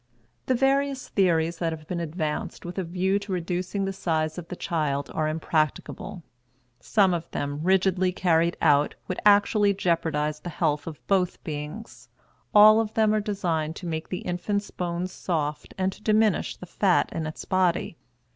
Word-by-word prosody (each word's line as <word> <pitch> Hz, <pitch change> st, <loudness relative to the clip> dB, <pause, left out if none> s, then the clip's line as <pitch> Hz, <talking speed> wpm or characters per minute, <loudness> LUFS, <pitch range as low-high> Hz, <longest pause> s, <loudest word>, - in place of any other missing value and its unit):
The 260 Hz, -, +3 dB
various 270 Hz, +1 st, +1 dB
theories 170 Hz, -4 st, +1 dB
that 165 Hz, -2 st, 0 dB
have 155 Hz, -1 st, -7 dB
been 180 Hz, -, -3 dB
advanced 160 Hz, -1 st, -3 dB
with 175 Hz, +2 st, -5 dB
a -, -, -1 dB
view 185 Hz, +3 st, 0 dB
to 200 Hz, 0 st, -8 dB
reducing 180 Hz, +2 st, -2 dB
the 195 Hz, -, -2 dB
size 160 Hz, -3 st, -1 dB
of 170 Hz, -, -9 dB
the 180 Hz, -, -6 dB
child 150 Hz, -5 st, -2 dB
are 155 Hz, -1 st, 0 dB
impracticable; 155 Hz, +2 st, -2 dB, 0.6 s
some 190 Hz, -, +3 dB
of 170 Hz, -1 st, -3 dB
them, 145 Hz, +1 st, -3 dB
rigidly 185 Hz, +1 st, +2 dB
carried 170 Hz, -2 st, +2 dB
out, 145 Hz, -1 st, +4 dB
would 185 Hz, -, -3 dB
actually 205 Hz, 0 st, +4 dB
jeopardize 160 Hz, -4 st, 0 dB
the 175 Hz, -, -7 dB
health 150 Hz, -2 st, -1 dB
of 155 Hz, -2 st, -8 dB
both 185 Hz, -2 st, 0 dB
beings. 150 Hz, +8 st, -7 dB, 0.4 s
All 215 Hz, +1 st, +8 dB
of 220 Hz, -1 st, -2 dB
them 220 Hz, -1 st, +3 dB
are 215 Hz, -, +2 dB
designed 170 Hz, -7 st, -2 dB
to -, -, -8 dB
make 160 Hz, -1 st, -4 dB
the 180 Hz, -, -3 dB
infant's 200 Hz, +3 st, -2 dB
bones 175 Hz, +1 st, -3 dB
soft 150 Hz, -5 st, -3 dB
and 190 Hz, 0 st, +1 dB
to -, -, -17 dB
diminish 215 Hz, -2 st, +2 dB
the -, -, -10 dB
fat 185 Hz, +1 st, +2 dB
in 160 Hz, -1 st, -3 dB
its 155 Hz, -, -7 dB
body. 185 Hz, -2 st, +1 dB
175 Hz, 170 wpm, -26 LUFS, 160-195 Hz, 0.6 s, All